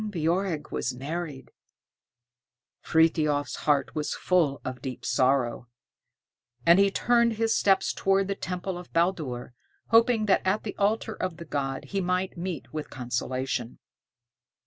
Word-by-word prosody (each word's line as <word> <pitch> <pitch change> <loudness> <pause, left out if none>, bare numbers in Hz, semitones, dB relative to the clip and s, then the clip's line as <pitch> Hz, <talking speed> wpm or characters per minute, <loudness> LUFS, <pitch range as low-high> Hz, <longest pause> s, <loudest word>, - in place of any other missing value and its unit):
Ingebjorg 175 -3 -1
was 125 +2 -2
married! 145 +1 -5 1.3
Frithiof's 155 -3 +2
heart 145 -2 +2
was 150 -1 -2
full 165 -7 +1
of 130 -1 -5
deep 130 -2 -6
sorrow, 125 -2 +1 1.0
and 170 +3 +7
he 200 0 +5
turned 235 +3 +2
his 225 +1 +1
steps 195 -1 +3
towards 195 0 +2
the 200 - 0
temple 180 -1 -4
of 180 - -12
Baldur, 155 -9 -1 0.4
hoping 230 -1 +4
that 195 - +3
at 195 +3 +1
the 210 - -5
altar 215 +2 +1
of 185 -5 -4
the 170 - -8
god 135 -3 -3
he 195 -1 -2
might 180 +1 -1
meet 170 -5 -5
with 155 -1 -4
consolation. 125 -1 -3
170 Hz, 135 wpm, -27 LUFS, 140-195 Hz, 1.3 s, and